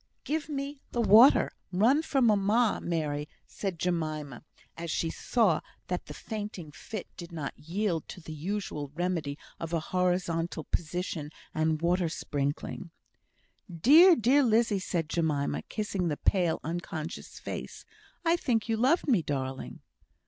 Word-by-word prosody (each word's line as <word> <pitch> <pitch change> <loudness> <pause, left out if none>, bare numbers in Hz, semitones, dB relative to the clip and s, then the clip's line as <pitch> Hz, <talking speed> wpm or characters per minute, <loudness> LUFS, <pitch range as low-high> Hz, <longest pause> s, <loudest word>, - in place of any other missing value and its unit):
"Give 310 0 -2
me 280 -1 -4
the 240 - -1
water. 230 +5 +7 0.2
Run 230 +11 +4
for 275 -4 +1
mamma, 215 +1 +3
Mary," 150 -3 -2 0.2
said 195 -4 -4
Jemima, 155 -6 -2 0.3
as 170 0 -6
she 165 +1 0
saw 215 -10 +2 0.3
that 180 0 -3
the - - -8
fainting 205 -7 -6
fit 215 +6 -7
did 170 -1 -9
not 155 -5 -4
yield 170 0 -2
to - - -8
the 160 -2 -8
usual 155 -3 -4
remedy 165 -5 -1 0.2
of 165 0 -5
a 165 - +2
horizontal 175 -3 0
position 165 -2 -3 0.2
and 155 0 +1
the 165 - -3
water 175 -1 +2
sprinkling. 145 +2 -3 0.8
"Dear! 300 - +7
dear 255 +4 +4
Lizzie!" 225 -4 +3
said 170 -4 -2
Jemima, 155 -4 0
kissing 200 -4 -2
the 150 -3 -1
pale, 175 -4 +2
unconscious 165 0 -5
face. - - -7 0.4
"I 335 +1 +4
think 230 -9 0
you 225 -1 0
loved 270 +10 +3
me, 230 -10 +4
darling." 135 -3 -4
180 Hz, 140 wpm, -29 LUFS, 160-220 Hz, 0.8 s, water